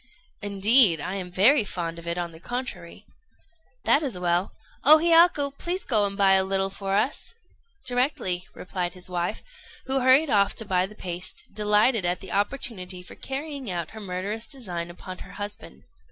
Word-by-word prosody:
"Indeed, 205 - +5
I 180 +5 -4
am 190 -2 -5
very 225 +9 +5
fond 170 -4 -5
of 170 - -12
it, 170 +1 -2
on 175 -1 -3
the 160 - -14
contrary." 245 +7 -6 0.8
"That 285 - +4
is 260 - -3
well. 175 +1 0 0.3
O 305 +3 +9
Hiyaku, 330 -3 +4
please 360 +2 -2
go 215 -5 +3
and 200 0 -6
buy 195 -2 +4
a 190 0 +4
little 195 0 -1
for 195 0 -3
us." 255 - -1 0.5
"Directly," 245 -8 -1
replied 180 -1 -4
his 180 0 -9
wife, 175 +3 -2 0.4
who 265 0 +1
hurried 265 +3 +5
off 200 -1 +3
to 225 - -2
buy 185 -1 +1
the 210 - -14
paste, 180 -2 -5
delighted 210 +1 +2
at 175 +1 0
the 190 - -9
opportunity 195 -4 -2
for - - -12
carrying 275 -2 -5
out 170 -3 -4
her 220 - -9
murderous 200 +4 -4
design 180 -10 -6
upon 185 +1 -9
her 190 - -11
husband. 85 - -7
200 Hz, 175 wpm, -25 LUFS, 180-250 Hz, 0.8 s, O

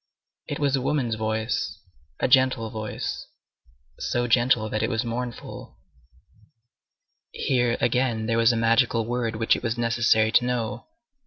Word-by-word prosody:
It - - -3
was 140 -2 +1
a 135 - -1
woman's 130 -3 0
voice, 110 -1 -2 0.4
a - - +1
gentle 130 -4 +3
voice, 110 -1 -5 0.7
so 120 0 -1
gentle 120 -1 +3
that 110 0 -2
it - - 0
was 115 +2 -1
mournful. 120 0 -6 1.5
Here, 120 -2 0
again, 120 -3 0
there 115 +1 +1
was 115 +1 +5
a 115 - -1
magical 115 0 +2
word 120 -1 -2
which 115 +1 +2
it - - -5
was 115 -1 -2
necessary 115 -2 +2
to 120 - +4
know. 115 -2 -3
115 Hz, 145 wpm, -25 LUFS, 110-125 Hz, 1.5 s, was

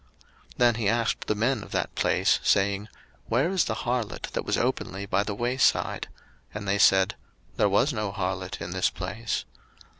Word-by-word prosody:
01:038:021 - - -34
Then 120 -1 +5
he 110 -3 -1
asked 115 +1 0
the 105 - +1
men 120 +5 +1
of - - -10
that - - -1
place, - - +2
saying, 100 +1 +2 0.4
Where 135 +10 +1
is 190 -4 +2
the 110 - -2
harlot, 120 -1 -3
that - - -1
was - - 0
openly 100 +2 -2
by 100 0 +1
the 100 0 -3
way 120 +4 -1
side? 135 - +2 0.5
And 105 -1 -5
they 100 +1 +1
said, 95 -2 +5 0.4
There 105 - +3
was 125 +9 +2
no 105 -3 -2
harlot 95 -1 -3
in 90 - -5
this 95 0 +1
place. 100 +6 -4
105 Hz, 185 wpm, -26 LUFS, 100-120 Hz, 0.5 s, Then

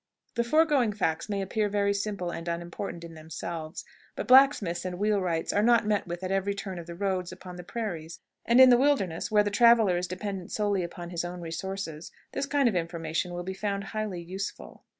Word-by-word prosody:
The 235 - +1
foregoing 280 -4 +3
facts 165 -2 -1
may 200 -1 -1
appear 210 +2 0
very 200 0 +1
simple 200 -3 -2
and 165 0 -6
unimportant 170 +1 -4
in 165 -1 -9
themselves, 160 +1 -6 0.3
but - - -4
blacksmiths 255 -10 +5
and 180 -1 -4
wheelwrights 185 -5 0
are 205 - +3
not 235 0 +4
met 210 -3 0
with 175 +1 -5
at 185 - -2
every 195 +1 0
turn 190 -3 -5
of 170 - -9
the 170 - -7
roads 185 -1 -1
upon 185 -1 -10
the 180 - -8
prairies; 170 -6 -5 0.2
and 235 +2 +4
in 260 -1 +10
the 245 - +7
wilderness, 225 - +1
where 210 -1 +4
the 205 - -2
traveler 225 -4 +5
is 180 +1 -2
dependent 185 0 -5
solely 205 -2 0
upon 175 0 -7
his 170 -1 -2
own 175 +1 -5
resources, 165 -1 -5 0.2
this 275 - -2
kind 285 -2 +3
of 230 - +2
information 165 0 -2
will 175 0 -4
be 190 +2 -4
found 200 0 -2
highly 210 -5 -3
useful. 190 +3 -7
190 Hz, 205 wpm, -28 LUFS, 175-210 Hz, 0.3 s, in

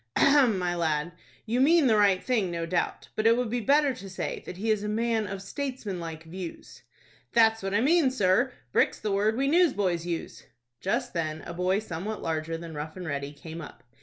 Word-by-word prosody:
"Ahem, 275 -7 +5
my 180 -1 -1
lad. 160 -1 0 0.3
You 240 +3 +1
mean 320 +2 +5
the 225 -4 +4
right 200 -3 +4
thing, 225 -8 +1
no 170 -1 -3
doubt; 175 +1 -2
but 215 +1 +2
it 230 +1 +5
would 245 -3 -1
be 245 - 0
better 280 +3 +3
to 195 -4 -9
say 185 - -4
that 180 - -7
he 220 +3 0
is 215 -2 +1
a 210 - -2
man 225 0 0
of 195 0 -6
statesman 240 -4 -4
like 165 -2 -6
views." 170 +1 -8 0.5
"That's 225 -1 +4
what 195 +1 -2
I 210 - +3
mean, 305 +1 +4
sir. 245 +1 +2 0.2
Brick's - - +2
the 210 - -2
word 210 +3 +1
we 275 +1 +1
newsboys 205 - +2
use." 170 -2 -5 0.3
Just 245 +6 -1
then 160 -2 -3
a 170 - -7
boy 180 +2 +1
somewhat 210 +1 -5
larger 160 0 -2
than 165 -1 -8
Rough 155 +3 -6
and 180 - -6
Ready 140 -1 -3
came 160 +3 -9
up. 150 - -11
195 Hz, 210 wpm, -27 LUFS, 170-235 Hz, 0.5 s, Ahem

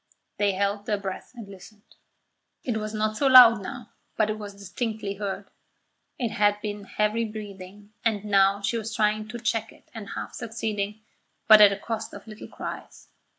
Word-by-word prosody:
They 205 -1 +2
held 200 +1 -1
their 210 - +1
breath 195 -2 -6
and 230 -4 -9
listened. 200 +2 -15 0.7
It 240 - -2
was 215 0 -4
not 215 0 -1
so 280 - +2
loud 245 -4 +9
now, 240 +2 -8 0.3
but 215 -1 +2
it 215 - -5
was 205 -1 -7
distinctly 205 +1 -4
heard. 200 0 -5 0.7
It 235 -4 -2
had 205 -1 +2
been 205 -1 -5
heavy 210 +3 0
breathing, 205 -1 -9
and 215 -3 0
now 200 -1 +3
she 230 +3 0
was 225 +1 -5
trying 215 0 +1
to 230 +2 -6
check 225 -1 -1
it - - -22
and 215 -3 -8
half - - -6
succeeding 215 -2 -4 0.5
but 215 -2 +9
at 205 - +10
the 200 - -3
cost 220 +2 -5
of - - -11
little 215 -1 -10
cries. - - -8
210 Hz, 180 wpm, -26 LUFS, 200-220 Hz, 0.7 s, at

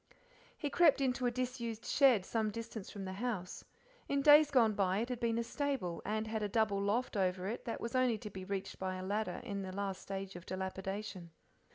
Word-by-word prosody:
He 290 -3 -3
crept 320 -3 +5
into 255 -2 +1
a - - +4
disused 240 -2 -3
shed 255 -9 +4
some 220 -2 0
distance 225 -1 -6
from 200 -2 -6
the 190 - -4
house; 200 -4 -3 0.5
in 280 0 +1
days 295 +1 +8
gone 235 -6 +4
by 195 -2 +1
it 230 +4 -1
had 250 -2 -3
been 230 -1 +1
a 235 - +1
stable, 255 - -2
and 215 +1 -1
had 220 0 -2
a 210 - -1
double 210 -2 +2
loft 215 +6 0
over 185 -2 0
it 220 +5 -4
that 230 - -3
was 230 - -4
only 255 -3 +3
to 210 -2 -8
be 190 -1 -7
reached 195 0 -4
by 185 0 -2
a 185 0 -5
ladder 210 +3 -2
in 200 -5 -4
the 190 -1 -5
last 195 0 -3
stage 195 -1 -5
of 175 0 -10
dilapidation. 190 0 -4
215 Hz, 215 wpm, -35 LUFS, 195-245 Hz, 0.5 s, days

